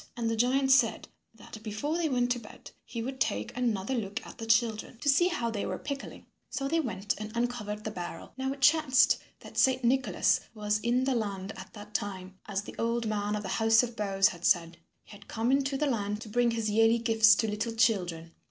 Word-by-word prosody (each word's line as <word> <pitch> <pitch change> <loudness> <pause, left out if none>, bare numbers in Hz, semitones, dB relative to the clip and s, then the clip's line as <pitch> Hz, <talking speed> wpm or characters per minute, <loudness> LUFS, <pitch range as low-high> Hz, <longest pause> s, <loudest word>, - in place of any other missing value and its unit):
And 235 -1 -1
the - - 0
giant 265 +4 +2
said 270 - +3 0.3
that 215 - -12
before 220 +8 -3
they 335 -2 0
went 245 -2 +1
to 245 - 0
bed 210 - -13
he 230 -1 -5
would 265 +2 -5
take 105 - -1
another 235 -3 -1
look 205 -5 -3
at - - -12
the 225 - -6
children 225 +1 +1
to 290 - -7
see 290 +5 +5
how 235 -10 -1
they 210 -2 -3
were - - -3
pickling. 280 -1 -7 0.2
So 275 - -3
they 330 +4 +1
went 205 -8 -2
and 215 0 -6
uncovered 220 -3 -2
the 215 - -4
barrel. 175 -4 -7
Now 265 +1 -2
it 275 0 -7
chanced 300 -2 +4 0.2
that - - -6
Saint 260 -1 +3
Nicholas 260 +2 +2 0.2
was 210 0 0
in 240 +3 +1
the 265 0 +1
land 200 -3 -3
at - - -11
that 210 -1 -11
time, 190 -2 -4
as 200 -1 -2
the - - -9
old 230 0 0
man 210 -1 -1
of 210 - -4
the 190 - -5
House 225 +3 +4
of 240 -1 -5
boughs 195 -2 +2
had 175 -1 -10
said. 170 -2 +2 0.3
He - - -18
had 205 -1 -14
come 230 +3 -1
into 275 0 +1
the 300 - 0
land 210 -6 -1
to 225 - -8
bring 240 +2 +2
his 225 -1 -1
yearly 225 +2 +4
gifts 225 -2 +5
to 225 - 0
little 215 +2 -3
children. 175 -8 +1
225 Hz, 225 wpm, -29 LUFS, 210-250 Hz, 0.3 s, see